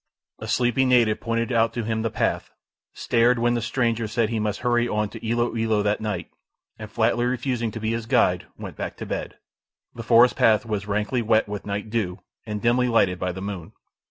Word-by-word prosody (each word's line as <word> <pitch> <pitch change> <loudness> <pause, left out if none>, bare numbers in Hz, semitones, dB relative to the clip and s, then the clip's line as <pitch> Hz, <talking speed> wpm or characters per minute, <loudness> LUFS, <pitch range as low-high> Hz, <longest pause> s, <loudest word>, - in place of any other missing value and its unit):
A - - -7
sleepy 125 +1 +2
native 120 -4 +3
pointed 115 +2 -2
out 115 -1 +2
to 120 - -3
him 110 0 -1
the 115 - -1
path, - - -1 0.4
stared, 120 +1 +2
when 120 +1 +2
the 120 - -1
stranger 115 -1 0
said 115 0 0
he 115 -1 -1
must 105 -1 -2
hurry 120 -1 +2
on 105 -2 -1
to 115 - -10
Ilo 120 +1 0
Ilo 110 -2 +1
that 105 +1 0
night, 100 -6 -4 0.5
and 110 -1 -7
flatly 120 +2 +1
refusing 125 -1 -1
to 115 - -7
be 110 0 -1
his 115 -1 -3
guide, - - +2
went - - -8
back - - -5
to - - -6
bed. - - -5 0.6
The 120 - -7
forest 120 +1 +5
path 110 0 +3
was 105 -3 -3
rankly 105 +4 -1
wet 110 -1 +2
with 105 0 -6
night 105 +1 -4
dew, 100 -6 -1 0.3
and 105 -1 -3
dimly 125 +1 +3
lighted 95 -7 +2
by 90 0 -1
the 95 +2 -7
moon. 95 -5 -6
115 Hz, 210 wpm, -24 LUFS, 105-120 Hz, 0.6 s, forest